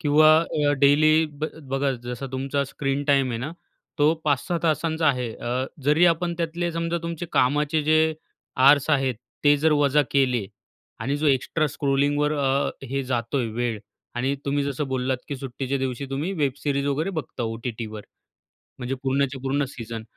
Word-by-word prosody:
किंवा 155 +1 +5
अ, 150 -3 0
डेली 155 +3 +5 0.2
ब - - 0 0.3
बघा, 135 +1 +1
जसा 125 +2 -5
तुमचा 135 +2 -1
स्क्रीन 135 +1 -2
टाईम 140 -3 +3
आहे 115 - -3
ना, 135 +7 -4 0.5
तो 150 +2 +5
5 145 -3 +1
6 175 -1 0
तासांचा 160 0 +1
आहे. 125 -4 0
अ, 125 +2 -2 0.2
जरी 150 +5 +4
आपण 170 +1 +1
त्यातले 170 +1 -1
समजा 165 +1 -1
तुमचे 170 0 -4
कामाचे 150 +4 +2
जे 155 +1 +3 0.4
आवर्स 140 +1 +5
आहेत, 135 -3 +2 0.3
ते 145 0 +6
जर 155 +2 +2
वजा 145 0 +3
केले 125 -6 +2 0.5
आणि 135 +5 -1
जो 150 +1 -1
एक्स्ट्रा 140 +3 +1
स्क्रोलिंगवर 145 +1 +1
अ, 140 -1 +1 0.2
हे 135 +2 -2
जातोय, 120 0 -1
वेळ. 120 -3 -1 0.4
आणि 130 +3 0
तुम्ही 145 0 0
जसं 140 +1 -2
बोललात 130 0 0
की 140 - -3
सुट्टीच्या 135 +1 -3
दिवशी 130 0 -3
तुम्ही 145 +8 -2
वेब 140 -3 +1
सीरीज 140 -1 0
वगैरे 150 +6 0
बघता 125 -4 -5
ओ-टी-टीवर, 115 -1 -5 0.8
म्हणजे 125 +2 -3
पूर्णच्या 135 0 0
पूर्ण 135 +2 0
सीझन. 115 -3 -7
140 Hz, 165 wpm, -24 LUFS, 130-150 Hz, 0.8 s, ते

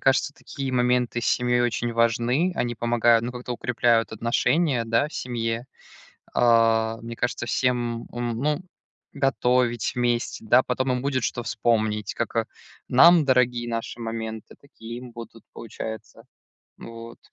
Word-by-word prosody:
кажется, 135 +1 +2
такие 135 -2 -6
моменты 125 -1 +1
с - - -4
семьей 120 0 +2
очень 120 0 -1
важны. 120 +8 +1
Они 120 -5 -1
помогают, 120 0 +3
ну 125 - -3
как-то, 125 0 -6
укрепляют 115 -1 +1
отношения, 120 +4 +1
да, 115 +6 +1
в - - -14
семье. 115 -1 -3 0.7
Э, 115 -1 +3
мне 115 0 -7
кажется, 120 0 -2
всем 120 -1 0
ум 120 -1 -3
ну 150 +5 0 0.5
готовить 125 -4 +1
вместе. 120 -2 -1
Да, 130 - +5
потом 130 +1 -1
им 125 0 -1
будет, 130 -2 -1
что 120 - -2
вспомнить, 110 -4 0
как, - - -4
а, - - +1 0.4
нам, 165 +5 +6
дорогие 125 -2 +2
наши 115 0 -4
моменты, 110 -1 -6
такие 120 -4 -10
им 125 -1 -10
будут, 115 -1 -11
получается. 110 0 -8 0.5
Вот. 115 0 -10
120 Hz, 140 wpm, -24 LUFS, 115-125 Hz, 0.7 s, нам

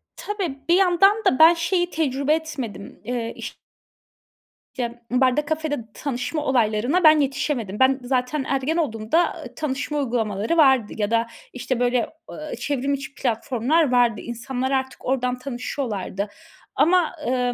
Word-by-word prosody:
Tabii, 370 -10 -4
bir 345 - +6
yandan 390 +3 +4
da 255 - +3
ben 325 +2 +9
şeyi 350 +1 0
tecrübe 285 -2 0
etmedim. 270 -11 -6
Eee, 235 -2 -3
iş - - -7 1.2
Ya, 240 -1 -4
barda, 260 +3 +2
kafede 310 -1 -2 0.2
tanışma 285 +3 -3
olaylarına 245 +6 +1
ben 310 -1 +7
yetişemedim. 270 -7 -1
Ben, 265 +1 +4
zaten 255 +3 -1
ergen 275 +4 0
olduğumda, 280 +2 0
eee, - - -11
tanışma 295 0 -3
uygulamaları 230 +2 -1
vardı. 265 -7 +4
Ya 210 +1 -1
da, 230 0 +2 0.3
işte, 255 0 -3
böyle, 245 0 +2 0.3
eee, 305 0 -6
çevrim 280 -1 -1
içi 275 +1 -5
platformlar 255 +5 0
vardı. 240 -3 +3
İnsanlar 250 +3 -4
artık 265 -1 -2
ordan 250 -1 0
tanışıyorlardı. 240 -6 -4 0.5
Ama, 355 0 +3
eee, 250 0 +1
265 Hz, 135 wpm, -23 LUFS, 245-305 Hz, 1.2 s, ben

